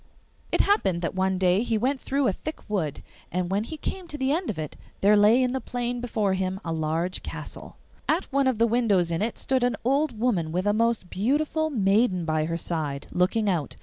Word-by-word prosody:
It - - +3
happened 190 - +2
that 170 - -1
one 190 0 +1
day 185 +1 +3
he 230 -2 0
went 260 +4 0
through 275 0 0
a 195 - +2
thick 310 +10 -7
wood, 175 -9 -2 0.3
and 180 +1 -1
when 200 +2 +1
he 315 - -6
came 365 +4 -5
to 295 - -6
the 265 -1 0
end 335 +3 0
of 210 - -3
it 155 -2 -5 0.3
there 205 +2 +6
lay 215 +5 +5
in 250 - +1
the 265 0 -2
plain 245 0 -3
before 215 -5 0
him 190 0 -2
a 165 - -2
large 160 +3 -1
castle. - - -8 0.3
At 330 +4 +2
one 275 -1 +3
of 260 -4 +1
the 230 - +4
windows 215 -7 +2
in 165 - -1
it 225 +2 -1
stood 260 -2 0
an 245 -1 +2
old 270 0 +1
woman 205 -9 0
with 180 +3 -1
a 205 - +3
most 230 -4 0
beautiful 300 +9 0
maiden 200 - +2
by 155 -1 +1
her 165 +1 -2
side, 150 -4 -3
looking 195 +5 +1
out. 170 -7 -1
210 Hz, 220 wpm, -26 LUFS, 180-250 Hz, 0.3 s, there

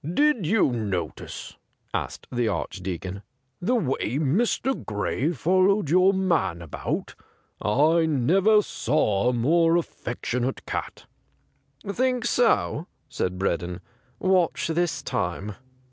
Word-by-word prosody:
' - - -47
Did 290 - +2
you 205 - +3
notice,' 95 - -4 0.4
asked - - -4
the 120 -2 0
Arch - - -3
deacon, 95 +1 -5 0.4
'the 240 +8 +1
way 135 - -1
Mr. 220 - 0
Gray 115 +8 -1
followed 185 - +2
your 185 +2 +6
man 180 - +1
about 80 - -4 0.4
} - - -37 0.3
I 165 -1 +3
never 190 - +4
saw 120 - +1
a - - 0
more 165 +8 +3
affectionate 125 -5 -3
cat.' - - -5 0.5
' 135 0 -33
Think 250 +4 0
so 225 -9 +2
?' - - -44
said 90 0 -2
Breddon. 90 -1 -2 0.2
' 125 -1 -37
Watch 185 -3 +2
this 170 0 0
time.' 100 +2 -2
155 Hz, 130 wpm, -25 LUFS, -, 0.5 s, your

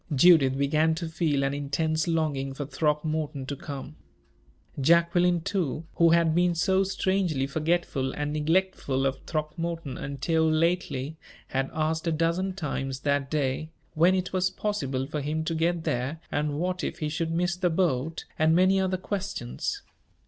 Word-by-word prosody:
Judith 135 -3 +6
began 155 +3 +2
to 165 0 -4
feel 155 -4 0
an 135 0 0
intense 155 +3 -1
longing 145 -5 -1
for 145 - -4
Throckmorton 150 0 -1
to 140 - -4
come. 140 +2 -8 0.8
Jacqueline, 170 +3 +3
too, 165 -4 -2
who 170 0 +6
had 165 -1 +4
been 175 +1 +2
so 190 +3 +2
strangely 190 -7 0
forgetful 155 -2 0
and 145 0 -3
neglectful 155 -4 0
of 135 0 0
Throckmorton 165 -1 -3
until 160 +4 0
lately, 155 -3 0 0.3
had 135 0 -1
asked 160 +1 -1
a - - +2
dozen 170 +4 0
times 135 -6 -3
that 140 -1 0
day, 145 0 -1 0.2
when 170 +4 +4
it 185 0 -2
was 185 0 +2
possible 135 -12 -2
for 150 +1 -4
him 155 +3 -2
to 165 - -1
get 165 +1 0
there, 145 0 -2
and 145 0 -1
what 180 +2 -2
if - - -3
he 155 -4 -2
should 160 +2 -2
miss 175 +1 0
the 180 -1 +1
boat, 160 -3 0
and 160 +1 +4
many 185 +2 +4
other 190 -1 0
questions. 185 - -4
160 Hz, 155 wpm, -27 LUFS, 140-175 Hz, 0.8 s, Judith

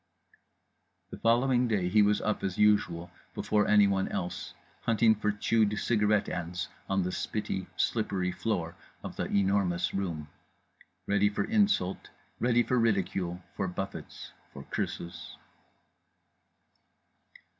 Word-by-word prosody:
The - - -8
following 120 +2 +3
day 100 -6 +1
he 105 +4 +4
was 105 0 +3
up 105 - -1
as 95 -2 -2
usual 95 -5 +2 0.2
before 105 -1 +1
anyone 100 -2 +4
else, 90 +1 -4 0.3
hunting 115 -1 +4
for 105 0 0
chewed 105 0 +1
cigarette 105 -3 +2
ends 90 +1 -4 0.2
on 95 -1 +1
the 90 - -2
spitty - - -3
slippery 95 -5 0
floor 90 -6 -2 0.3
of - - -6
The - - -2
Enormous 95 -3 +1
Room; 85 -6 -3 0.8
ready 100 0 +3
for 105 - -1
insult, 205 - +1 0.3
ready 120 0 +3
for 125 +1 +1
ridicule, 95 -5 0
for 95 - -1
buffets, 95 +2 -6 0.2
for - - -9
curses. 85 - -5
100 Hz, 120 wpm, -29 LUFS, 90-110 Hz, 0.8 s, he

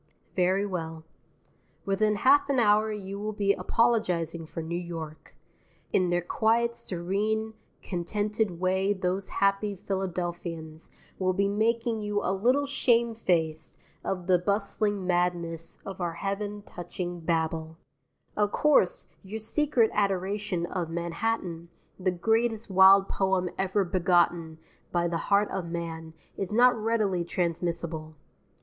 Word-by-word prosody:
Very 190 +2 +2
well. 165 -4 -4 0.8
Within 210 +2 +2
half 280 +6 +4
an 275 - +2
hour 215 -1 +4
you 200 -1 -5
will 215 +1 -3
be 200 -1 +2
apologizing 180 -6 0
for 165 - -6
New 165 +2 -4
York. 165 -3 -7 0.6
In 185 -2 +3
their 175 0 +1
quiet, 230 +5 +2
serene, 210 +4 -2 0.3
contented 205 +1 -2
way 190 +2 +2
those 190 0 -2
happy 200 +1 +1
Philadelphians 175 -4 -4 0.3
will 185 -1 +2
be 200 +1 +1
making 225 +2 0
you 210 0 -1
a 185 - +1
little 250 +9 +2
shame 235 -4 +2
faced 160 -7 -1 0.3
of 180 -2 -3
the 180 -1 +4
bustling 200 +1 0
madness 175 -2 -1
of 195 -1 -7
our 170 -1 -1
heaven 205 +2 -4
touching 175 -1 -6
Babel. 160 -1 -1 0.6
Of 205 -1 +1
course, 305 - +3 0.2
your 200 +2 -6
secret 230 +1 +1
adoration 195 -2 0
of 175 -2 -3
Manhattan, 170 0 -2 0.3
the 185 0 +1
greatest 225 +4 0
wild 190 +1 +7
poem 190 -2 0
ever 190 +1 +1
begotten 175 -3 +1 0.3
by 175 0 +1
the 170 -1 -1
heart 205 +1 +3
of 180 -3 -3
man, 165 -1 -5 0.2
is 195 -1 -3
not 245 +3 +5
readily 215 -5 0
transmissible. 170 -2 -3
190 Hz, 130 wpm, -28 LUFS, 170-210 Hz, 0.8 s, wild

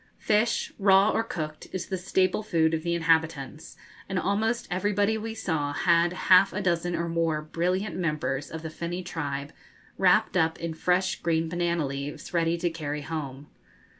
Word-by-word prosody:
Fish 215 +2 +1
raw 195 +1 +5
or - - +1
cooked 155 -8 -6
is 185 - -3
the 190 - -3
staple 185 +1 +1
food 165 -6 +1
of 160 - 0
the 170 +1 -1
inhabitants, 160 -3 0 0.3
and 190 - -2
almost 220 +5 0
everybody 205 +3 +1
we 220 +1 -4
saw 155 -9 -2
had 170 +2 +3 0.2
half 190 +2 +7
a 205 - -2
dozen 175 -2 0
or 170 - -2
more 165 -2 0
brilliant 180 +4 -1
members 150 -5 -2
of 160 0 -7
the 160 - -5
finny 175 +3 -4
tribe, 145 -4 -4 0.5
wrapped 195 +3 +4
up 160 -2 +2
in 165 -1 -3
fresh 180 +3 0
green 165 -1 +1
banana 170 -1 0
leaves, 140 +5 -6
ready 170 0 +1
to 170 0 -1
carry 150 -2 -4
home. 145 -3 -5
170 Hz, 165 wpm, -27 LUFS, 160-190 Hz, 0.5 s, half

